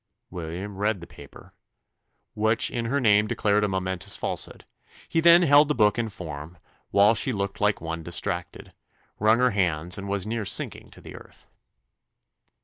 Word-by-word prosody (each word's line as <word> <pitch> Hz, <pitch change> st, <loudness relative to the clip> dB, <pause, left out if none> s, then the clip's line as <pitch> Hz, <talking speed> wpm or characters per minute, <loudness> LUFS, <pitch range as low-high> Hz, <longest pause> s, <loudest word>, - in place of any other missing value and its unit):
William 90 Hz, +3 st, -6 dB
read 105 Hz, 0 st, 0 dB
the 85 Hz, -, -10 dB
paper, 70 Hz, -4 st, -15 dB, 0.8 s
which 110 Hz, +1 st, +1 dB
in 115 Hz, -1 st, -3 dB
her 140 Hz, +5 st, 0 dB
name 105 Hz, -4 st, +3 dB
declared 105 Hz, 0 st, +1 dB
a -, -, +2 dB
momentous 95 Hz, -2 st, -1 dB
falsehood: -, -, -4 dB, 0.4 s
he 165 Hz, -, 0 dB
then 170 Hz, +1 st, +7 dB
held 145 Hz, -1 st, +6 dB
the 150 Hz, -, 0 dB
book 105 Hz, 0 st, +2 dB
in 115 Hz, -1 st, -2 dB
form, 80 Hz, -4 st, -9 dB, 0.3 s
while 100 Hz, +2 st, +5 dB
she 130 Hz, -, 0 dB
looked 100 Hz, -3 st, -4 dB
like 105 Hz, 0 st, +1 dB
one 80 Hz, 0 st, -5 dB
distracted 85 Hz, +1 st, -4 dB, 0.5 s
wrung 110 Hz, +2 st, +4 dB
her 125 Hz, 0 st, +2 dB
hands, 90 Hz, -3 st, +1 dB
and 100 Hz, -, -7 dB
was 100 Hz, -1 st, -2 dB
near 110 Hz, 0 st, -3 dB
sinking 100 Hz, -, -3 dB
to -, -, -16 dB
the -, -, -11 dB
earth. -, -, -15 dB
105 Hz, 165 wpm, -25 LUFS, 90-110 Hz, 0.8 s, then